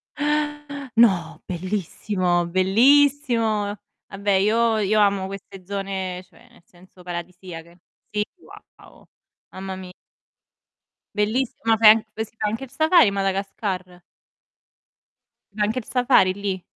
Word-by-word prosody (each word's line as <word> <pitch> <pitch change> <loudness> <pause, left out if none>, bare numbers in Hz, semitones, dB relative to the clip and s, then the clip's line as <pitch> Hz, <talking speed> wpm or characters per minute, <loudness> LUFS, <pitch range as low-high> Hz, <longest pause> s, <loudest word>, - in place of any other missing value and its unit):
Eh! 295 -2 -2
No! 190 -8 +3
Bellissimo! 185 -1 -1
Bellissimo! 225 +2 +3 0.3
Vabbè 200 +1 -2
io 220 +4 +3
io 215 0 +2
amo 200 -2 +2
queste 195 -1 -10
zone, 190 -2 -4
cioè, 235 +6 -22
nel 235 -7 -22
senso 180 0 -19
paradisiache. 175 -1 -8 0.3
Sì, 210 0 -1 0.5
wow, - - -18 0.5
mamma 190 0 -7
mi 185 -1 -9 1.2
Bellissima, 225 +1 0
fai 220 -1 +8
anche 220 0 -1
sa - - -21
anche 225 +5 -2
il 255 - -19
Safari 320 -3 +5
in 200 - 0
Madagascar? 195 -2 -3 1.5
C'è 215 - -3
anche 220 +5 0
il 230 - -11
Safari 245 -7 +3
lì? 195 -1 -4
200 Hz, 115 wpm, -23 LUFS, 185-230 Hz, 1.5 s, fai